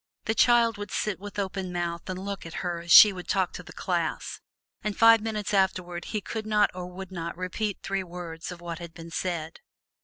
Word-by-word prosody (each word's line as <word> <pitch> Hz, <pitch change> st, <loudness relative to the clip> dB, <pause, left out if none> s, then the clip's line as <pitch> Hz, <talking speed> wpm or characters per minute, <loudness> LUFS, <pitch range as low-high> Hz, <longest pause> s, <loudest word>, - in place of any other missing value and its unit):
The 220 Hz, -, +1 dB
child 230 Hz, -2 st, +4 dB
would 205 Hz, -, -5 dB
sit 210 Hz, -4 st, -2 dB
with 205 Hz, +1 st, -9 dB
open 190 Hz, -2 st, -3 dB
mouth 170 Hz, 0 st, -3 dB
and 185 Hz, -, -3 dB
look 195 Hz, 0 st, -5 dB
at 165 Hz, 0 st, -9 dB
her 175 Hz, -1 st, -2 dB
as 170 Hz, -1 st, -6 dB
she 210 Hz, +3 st, +11 dB
would 180 Hz, -1 st, -8 dB
talk 190 Hz, -2 st, +1 dB
to -, -, -6 dB
the -, -, -13 dB
class, -, -, -2 dB, 0.4 s
and 210 Hz, -2 st, -3 dB
five 230 Hz, -1 st, +7 dB
minutes 215 Hz, -2 st, -3 dB
afterward 180 Hz, -3 st, 0 dB
he 215 Hz, -2 st, -3 dB
could 215 Hz, +1 st, -5 dB
not 210 Hz, -1 st, +3 dB
or 180 Hz, -1 st, -6 dB
would 185 Hz, +1 st, -9 dB
not 170 Hz, -2 st, -5 dB
repeat 190 Hz, +3 st, -3 dB
three 195 Hz, 0 st, -1 dB
words 170 Hz, -1 st, -7 dB
of 175 Hz, -1 st, -9 dB
what 170 Hz, 0 st, -5 dB
had 170 Hz, -1 st, -9 dB
been 165 Hz, 0 st, -10 dB
said. 165 Hz, -3 st, -3 dB
185 Hz, 215 wpm, -27 LUFS, 175-205 Hz, 0.4 s, she